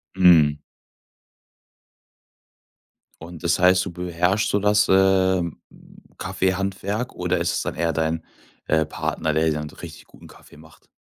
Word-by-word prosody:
Mhm. 80 Hz, -6 st, +5 dB, 2.6 s
Und 85 Hz, +1 st, -11 dB
das 85 Hz, +1 st, +1 dB
heißt, 90 Hz, 0 st, +4 dB
du 95 Hz, -, -6 dB
beherrscht 90 Hz, +4 st, -1 dB
so 100 Hz, -, +1 dB
das, 105 Hz, +1 st, +2 dB
äh, 95 Hz, -1 st, +3 dB, 0.8 s
Kaffeehandwerk 100 Hz, +4 st, -2 dB
oder 90 Hz, 0 st, -1 dB
ist 85 Hz, +1 st, 0 dB
es -, -, -1 dB
dann -, -, -4 dB
eher 85 Hz, +1 st, 0 dB
dein, 80 Hz, +1 st, -2 dB, 0.4 s
äh, 80 Hz, 0 st, +2 dB
Partner, 80 Hz, -1 st, -3 dB
der 80 Hz, +1 st, +1 dB
dir 80 Hz, -, +1 dB
dann 75 Hz, 0 st, -5 dB
so -, -, -16 dB
richtig -, -, -11 dB
guten -, -, -17 dB
Kaffee -, -, -18 dB
macht? 80 Hz, +1 st, -19 dB
90 Hz, 140 wpm, -22 LUFS, 80-95 Hz, 2.6 s, Mhm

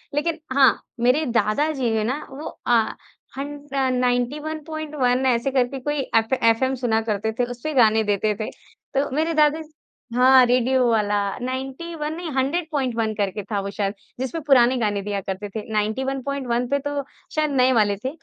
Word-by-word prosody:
लेकिन 320 Hz, +2 st, 0 dB
हाँ, 270 Hz, -1 st, +5 dB, 0.2 s
मेरे 250 Hz, +6 st, +3 dB
दादाजी 260 Hz, +3 st, +1 dB
है 215 Hz, -, +1 dB
ना 260 Hz, +7 st, -2 dB
वो 290 Hz, +4 st, -8 dB, 0.2 s
अ, 235 Hz, -2 st, +2 dB, 0.4 s
हन 285 Hz, +1 st, -4 dB, 0.2 s
अ, 265 Hz, -1 st, +1 dB
91.1 285 Hz, +2 st, -1 dB
ऐसे 255 Hz, +1 st, +2 dB
करके 260 Hz, 0 st, 0 dB
कोई 295 Hz, +3 st, -2 dB, 0.2 s
एफ 225 Hz, +3 st, +3 dB
एफएम 245 Hz, +4 st, +3 dB
सुना 225 Hz, -2 st, +2 dB
करते 215 Hz, +2 st, 0 dB
थे, -, -, +4 dB
उसपे 270 Hz, +6 st, -5 dB
गाने 220 Hz, -3 st, +4 dB
देते 205 Hz, +1 st, 0 dB
थे। 215 Hz, -, -3 dB
तो 275 Hz, +1 st, -5 dB
मेरे 320 Hz, +2 st, +1 dB
दादा 305 Hz, 0 st, +3 dB, 0.5 s
हाँ, 255 Hz, 0 st, +7 dB
रेडियो 255 Hz, +1 st, +2 dB
वाला 210 Hz, -2 st, +2 dB, 0.3 s
91 270 Hz, +5 st, -4 dB
नहीं 345 Hz, -1 st, -5 dB
100.1 265 Hz, -6 st, 0 dB
करके 200 Hz, 0 st, -2 dB
था 205 Hz, -, +1 dB
वो 200 Hz, -, -4 dB
शायद 200 Hz, -1 st, -2 dB, 0.3 s
जिसमें 265 Hz, +6 st, -3 dB
पुराने 255 Hz, -2 st, +5 dB
गाने 205 Hz, -2 st, 0 dB
दिया 205 Hz, 0 st, -3 dB
करते 195 Hz, +2 st, -5 dB
थे। 220 Hz, -, -2 dB
91.1 255 Hz, +3 st, -1 dB
पे 280 Hz, +2 st, +1 dB
तो 290 Hz, 0 st, -3 dB, 0.3 s
शायद 305 Hz, -1 st, +1 dB
नए 260 Hz, -1 st, +4 dB
वाले 205 Hz, -3 st, +3 dB
थे, 260 Hz, -, +1 dB
255 Hz, 160 wpm, -23 LUFS, 225-285 Hz, 0.5 s, हाँ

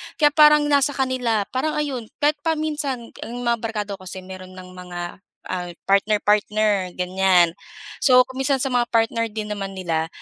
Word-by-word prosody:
Kaya 295 Hz, -2 st, +4 dB
parang 300 Hz, -1 st, +6 dB
nasa 285 Hz, 0 st, +3 dB
kanila, 255 Hz, -5 st, 0 dB
parang 265 Hz, +4 st, -1 dB
ayun 270 Hz, -7 st, -3 dB, 0.2 s
kahit 295 Hz, 0 st, +3 dB
pa 320 Hz, +2 st, 0 dB
minsan, 295 Hz, -6 st, -3 dB
ang 235 Hz, -, -7 dB
mga 235 Hz, -1 st, +1 dB
barkada 215 Hz, -2 st, -4 dB
ko 185 Hz, -, -12 dB
kasi 185 Hz, +1 st, -7 dB
mayro'n 185 Hz, 0 st, -10 dB
ng 185 Hz, 0 st, -11 dB
mga, 180 Hz, -1 st, -9 dB, 0.5 s
ah, 180 Hz, -1 st, -4 dB, 0.2 s
partner-partner, 210 Hz, -1 st, +2 dB
ganyan. 180 Hz, -1 st, +3 dB, 0.5 s
So, 255 Hz, -2 st, +7 dB
kung 260 Hz, -, -10 dB
minsan 270 Hz, -1 st, +1 dB
sa 270 Hz, -, 0 dB
mga 245 Hz, -1 st, +2 dB
partner 230 Hz, 0 st, +1 dB
din 210 Hz, 0 st, -5 dB
naman 195 Hz, -2 st, -4 dB
nila 165 Hz, -3 st, -1 dB
225 Hz, 170 wpm, -22 LUFS, 190-270 Hz, 0.5 s, So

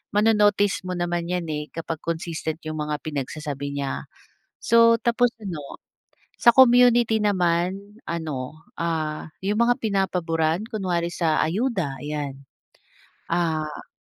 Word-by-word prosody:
mano-notice 210 Hz, -2 st, +3 dB
mo 180 Hz, -, -2 dB
naman 175 Hz, -1 st, -2 dB
yan, 180 Hz, -2 st, -1 dB
eh, 150 Hz, 0 st, -3 dB
kapag 165 Hz, -1 st, -4 dB
consistent 160 Hz, -1 st, -3 dB
yung 155 Hz, 0 st, -4 dB
mga 150 Hz, 0 st, -1 dB
pinagsasabi 145 Hz, -1 st, -4 dB
niya. 140 Hz, -1 st, -3 dB, 0.6 s
So, 230 Hz, 0 st, +6 dB
tapos 240 Hz, +1 st, +3 dB
ano 180 Hz, -7 st, -5 dB, 0.8 s
sa 235 Hz, -, +7 dB
community 240 Hz, -3 st, +6 dB
naman 190 Hz, +1 st, 0 dB
ano, 155 Hz, -2 st, -5 dB
ah, 160 Hz, -2 st, -2 dB
yung 205 Hz, +2 st, 0 dB
mga 245 Hz, +2 st, +2 dB
pinapaburan 175 Hz, -4 st, 0 dB
kunwari 180 Hz, -7 st, -1 dB
sa 160 Hz, -3 st, +1 dB
ayuda, 185 Hz, -, -1 dB
ayan. 145 Hz, -2 st, -5 dB, 0.9 s
Ah 160 Hz, -3 st, -1 dB
170 Hz, 115 wpm, -24 LUFS, 155-205 Hz, 0.9 s, sa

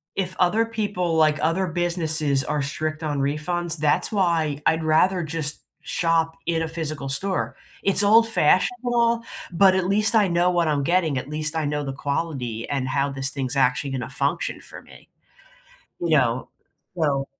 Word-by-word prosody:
if 185 Hz, -1 st, -2 dB
other 210 Hz, +6 st, +3 dB
people, 205 Hz, -7 st, -2 dB
like, 155 Hz, -1 st, +3 dB
other 180 Hz, +4 st, 0 dB
businesses 160 Hz, -5 st, 0 dB
are 150 Hz, 0 st, -2 dB
strict 155 Hz, +2 st, -3 dB
on 145 Hz, -2 st, -2 dB
refunds, 160 Hz, +4 st, -1 dB
that's 150 Hz, +6 st, +1 dB
why 165 Hz, -7 st, 0 dB
I'd 160 Hz, 0 st, +2 dB
rather 170 Hz, +4 st, +2 dB
just 155 Hz, -1 st, -4 dB, 0.2 s
shop 165 Hz, -1 st, 0 dB
in 165 Hz, -1 st, 0 dB
a 165 Hz, -, -2 dB
physical 155 Hz, -4 st, -4 dB
store, 190 Hz, +8 st, -2 dB, 0.3 s
it's 195 Hz, +1 st, +4 dB
old 225 Hz, +3 st, +5 dB
fashionable 235 Hz, +5 st, +2 dB, 0.3 s
but 190 Hz, +2 st, +5 dB
at 185 Hz, -1 st, 0 dB
least 210 Hz, +3 st, +4 dB
I 210 Hz, -3 st, +4 dB
know 175 Hz, 0 st, +2 dB
what 175 Hz, -2 st, +1 dB
I'm 145 Hz, -2 st, 0 dB
getting. 165 Hz, -3 st, +1 dB
At 130 Hz, -, -4 dB
least 155 Hz, +1 st, -1 dB
I 160 Hz, -2 st, -1 dB
know 150 Hz, 0 st, -2 dB
the 135 Hz, -1 st, -4 dB
quality 135 Hz, -5 st, -4 dB
and 135 Hz, -2 st, -2 dB
how 140 Hz, +1 st, 0 dB
this 135 Hz, 0 st, 0 dB
thing's 135 Hz, -2 st, -3 dB
actually 135 Hz, +2 st, +1 dB
gonna 130 Hz, -1 st, -4 dB
function -, -, -2 dB
for -, -, -11 dB
me, -, -, -18 dB, 0.9 s
you 170 Hz, -, -2 dB
know? 125 Hz, -2 st, 0 dB, 0.5 s
So 140 Hz, -5 st, 0 dB
160 Hz, 170 wpm, -23 LUFS, 145-180 Hz, 0.9 s, old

